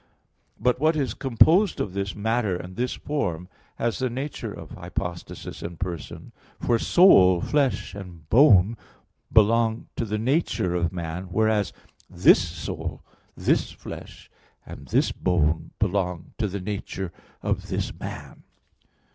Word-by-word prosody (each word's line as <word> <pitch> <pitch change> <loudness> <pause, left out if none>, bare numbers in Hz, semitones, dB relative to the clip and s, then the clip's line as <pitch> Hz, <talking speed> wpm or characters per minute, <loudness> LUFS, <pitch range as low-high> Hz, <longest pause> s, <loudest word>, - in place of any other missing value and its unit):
But 125 0 +2
what 155 +2 +3
is 135 -8 -1
composed 160 - +4
of 95 - -2
this 100 0 -3
matter 110 -2 0
and 90 +1 -7
this 125 +2 -1
form 90 - -3 0.3
has 115 -1 -1
the 130 -1 0
nature 135 +5 -5
of - - -10
hypostasis 85 0 -6
and 85 -1 -7
person. 85 -5 -6 0.3
For 115 -1 +1
soul, 95 - +6
flesh, 110 - 0
and 90 -6 -10
bone 115 - +6 0.5
belong 115 +1 +3
to 115 - -1
the 105 0 -2
nature 120 - 0
of 85 -1 0
man; 85 0 -5
whereas 105 +2 +1 0.4
this 90 -1 +5
soul, 85 -1 -5 0.3
this - - +1
flesh - - -10 0.3
and - - -10
this - - +2
bone 80 -3 0
belong 90 -4 -1
to 110 - +1
the 100 0 -5
nature 95 -2 -5 0.3
of - - -1
this - - -2
man. - - -8
100 Hz, 135 wpm, -25 LUFS, 90-120 Hz, 0.5 s, soul